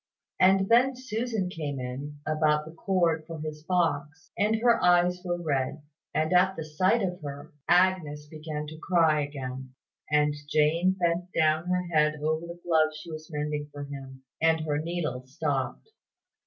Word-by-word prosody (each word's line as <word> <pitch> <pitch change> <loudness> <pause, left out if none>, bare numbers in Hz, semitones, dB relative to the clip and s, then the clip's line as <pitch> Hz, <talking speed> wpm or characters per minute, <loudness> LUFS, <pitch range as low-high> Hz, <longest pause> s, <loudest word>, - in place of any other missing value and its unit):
And 190 +1 +5
then 250 +4 +4
Susan 230 -5 -2
came 150 -6 -4
in, 140 +4 -6
about 155 -1 +2
the 160 - -9
cord 170 -2 +1
for 165 -2 -7
his 150 0 -6
box, 160 -2 -1
and 210 +2 +2
her 235 +1 +3
eyes 180 0 +4
were 175 -1 -2
red: 145 -2 -1 0.3
and, 155 +3 0
at 185 +1 +4
the 160 - -5
sight 185 +9 +2
of 180 -2 -3
her, 145 +1 -8 0.2
Agnes 175 -5 +3
began 155 0 -6
to 155 +1 -9
cry 160 -4 +3
again; 130 -2 -6 0.3
and 150 0 +3 0.2
Jane 160 +5 +3
bent 175 -1 -1
down 155 +2 +2
her 180 0 +1
head 150 -1 +3
over 155 +2 -2
the 170 0 -9
glove 160 -2 +4
she 155 +2 -9
was 155 0 -8
mending 150 0 -3
for 145 0 -7
him, 135 -2 -9 0.2
and 160 0 +3
her 150 -2 -1
needle 155 -6 -3
stopped. 140 - -3
155 Hz, 165 wpm, -28 LUFS, 150-180 Hz, 0.3 s, And